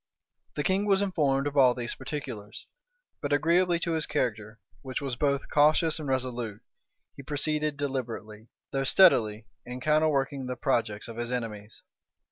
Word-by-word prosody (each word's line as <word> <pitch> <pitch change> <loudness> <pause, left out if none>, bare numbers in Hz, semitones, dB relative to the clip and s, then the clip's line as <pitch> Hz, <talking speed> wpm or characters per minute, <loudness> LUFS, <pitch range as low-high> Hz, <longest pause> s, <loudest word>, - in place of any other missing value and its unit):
The 145 - -1
king 195 +4 +1
was 195 0 +3
informed 145 -8 +1
of 145 0 -3
all 130 -3 +5
these 120 -1 -3
particulars; 130 -7 -7 0.6
but 145 - -3
agreeably 170 +4 +3
to 170 - -1
his 160 -2 +1
character, 110 -6 -2 0.2
which 130 -1 -4
was 135 -3 -3
both 140 +1 0
cautious 155 +2 +3
and 150 -3 -5
resolute, 120 -5 -2 0.5
he - - -9
proceeded 150 +1 -1
deliberately, 115 -6 -5 0.2
though 135 0 -1
steadily, 115 - +4 0.2
in 125 +1 -7
counterworking 140 -2 +1
the 125 - -3
projects 110 -3 -1
of 115 -1 -9
his 120 +1 -3
enemies. 110 -4 -5
135 Hz, 150 wpm, -28 LUFS, 120-150 Hz, 0.6 s, all